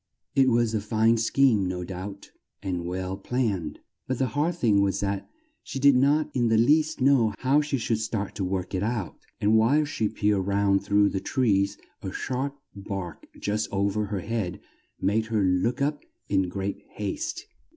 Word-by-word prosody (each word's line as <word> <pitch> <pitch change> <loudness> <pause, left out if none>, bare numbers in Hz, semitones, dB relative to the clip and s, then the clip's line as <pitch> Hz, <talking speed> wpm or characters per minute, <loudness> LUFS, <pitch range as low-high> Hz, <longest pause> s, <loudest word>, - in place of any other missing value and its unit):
It 135 -1 +4
was 120 -2 +2
a 110 - 0
fine 110 +2 +2
scheme, 115 -3 +3
no 90 -1 -3
doubt, 95 +2 -7 0.3
and 90 -3 -3
well 95 +1 -3
planned, 100 - -2 0.3
but 130 - -1
the 130 0 0
hard 155 +4 +1
thing 110 -11 +3
was 100 -1 +1
that 100 -1 -2 0.3
she - - -7
did 140 0 +5
not 145 +4 +3
in 120 -2 +2
the 115 -1 +3
least 155 +5 +3
know 125 -6 +4
how 135 +3 +3
she 150 -2 -1
should 115 -2 -1
start 110 -2 -3
to 100 - -3
work 95 0 -2
it 95 - 0
out; 110 -4 -3 0.2
and 105 +2 +3
while 140 +7 +3
she 110 -7 -1
peered 105 -3 0
round 100 -1 +2
through 100 0 +3
the 95 - -2
trees, 100 -5 +1 0.2
a - - -5
sharp 135 +2 -3 0.2
bark 95 -5 -6
just 105 +1 -1
o 100 0 +1
ver 105 +1 -1
her 100 -2 -3
head 110 -4 -3 0.4
made 110 +3 +1
her 110 -3 +1
look 95 +9 +1
up 145 +1 -1 0.2
in 95 -2 +1
great 95 +2 -4
haste. 105 -2 -4
105 Hz, 180 wpm, -26 LUFS, 95-125 Hz, 0.4 s, did